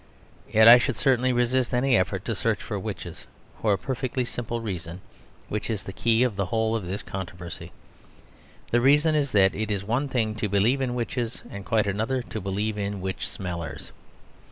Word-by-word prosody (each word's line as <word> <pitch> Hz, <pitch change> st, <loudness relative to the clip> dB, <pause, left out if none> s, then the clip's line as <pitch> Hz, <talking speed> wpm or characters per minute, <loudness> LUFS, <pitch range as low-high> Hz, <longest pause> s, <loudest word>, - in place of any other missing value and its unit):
Yet 110 Hz, +1 st, +6 dB
I 120 Hz, +1 st, +11 dB
should 125 Hz, 0 st, -1 dB
certainly 130 Hz, -2 st, +2 dB
resist 125 Hz, +1 st, +1 dB
any 130 Hz, +1 st, +3 dB
effort 95 Hz, -, 0 dB
to -, -, -1 dB
search -, -, 0 dB
for -, -, -4 dB
witches, -, -, -7 dB, 0.3 s
for 110 Hz, -, +2 dB
a -, -, +1 dB
perfectly 130 Hz, +1 st, -2 dB
simple 120 Hz, -1 st, -4 dB
reason, 90 Hz, -5 st, -5 dB, 0.5 s
which 105 Hz, +2 st, -3 dB
is 110 Hz, -3 st, -2 dB
the 95 Hz, -, -7 dB
key 115 Hz, +3 st, +2 dB
of 125 Hz, -5 st, 0 dB
the 100 Hz, -2 st, 0 dB
whole 110 Hz, +2 st, 0 dB
of 105 Hz, -6 st, -3 dB
this 100 Hz, +3 st, -4 dB
controversy. 85 Hz, -3 st, -7 dB, 1.0 s
The 120 Hz, -, +3 dB
reason 150 Hz, +5 st, +4 dB
is 145 Hz, -3 st, +1 dB
that 95 Hz, -2 st, +5 dB
it 110 Hz, +1 st, -3 dB
is 100 Hz, -2 st, -1 dB
one 120 Hz, +7 st, 0 dB
thing 115 Hz, -5 st, 0 dB
to 105 Hz, -2 st, -1 dB
believe 110 Hz, +7 st, +2 dB
in 125 Hz, -2 st, -1 dB
witches, 120 Hz, 0 st, -3 dB
and 100 Hz, 0 st, -7 dB
quite 110 Hz, +1 st, +1 dB
another 110 Hz, +6 st, -1 dB
to 110 Hz, -2 st, -6 dB
believe 105 Hz, +3 st, -2 dB
in 100 Hz, 0 st, -3 dB
witch 95 Hz, 0 st, -4 dB
smellers. 85 Hz, -5 st, -6 dB
110 Hz, 190 wpm, -26 LUFS, 100-125 Hz, 1.0 s, I